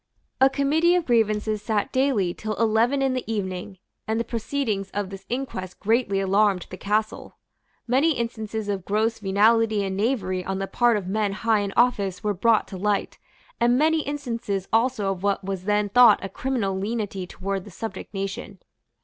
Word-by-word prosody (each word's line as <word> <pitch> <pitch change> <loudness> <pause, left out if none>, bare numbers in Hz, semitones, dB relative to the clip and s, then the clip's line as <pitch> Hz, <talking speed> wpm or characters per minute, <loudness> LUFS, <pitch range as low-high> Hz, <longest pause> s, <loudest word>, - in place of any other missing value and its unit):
A 265 - +6
Committee 310 +6 +2
of 355 -2 +1
Grievances 215 -2 +1
sate 215 +3 -1
daily 255 -10 +1
till 215 +2 -4
eleven 230 +5 +2
in 265 -1 +1
the 255 - -2
evening; 190 -2 -4 0.3
and 220 +1 0
the - - +1
proceedings 225 -4 -2
of 205 -2 -2
this 195 0 -10
inquest 235 -8 -4
greatly 220 -2 +1
alarmed 195 -1 +2
the 185 - -7
Castle. 215 +3 -2 0.5
Many 270 +7 +3
instances 220 -3 -4
of 200 -3 -2
gross 220 +4 0
venality 215 +1 +3
and 190 -1 -3
knavery 195 -4 -1
on 190 +1 -3
the 195 - -2
part 235 +4 +2
of 200 - -4
men 205 +1 -1
high 220 +1 +1
in 200 -1 -2
office 200 -7 +2
were 210 -1 +1
brought 220 +3 +2
to 190 - -7
light, 205 +1 -1 0.4
and 240 +1 +3
many 315 +2 +3
instances 235 -9 -3
also 225 -3 +2
of 185 -2 -5
what 200 0 0
was 190 -1 -4
then 210 0 +2
thought 235 0 +7
a - - -5
criminal 225 -3 -2
lenity 200 -2 -3
towards 195 0 -4
the - - -10
subject 220 +4 -7
nation. 195 -1 -5
215 Hz, 175 wpm, -24 LUFS, 195-235 Hz, 0.5 s, thought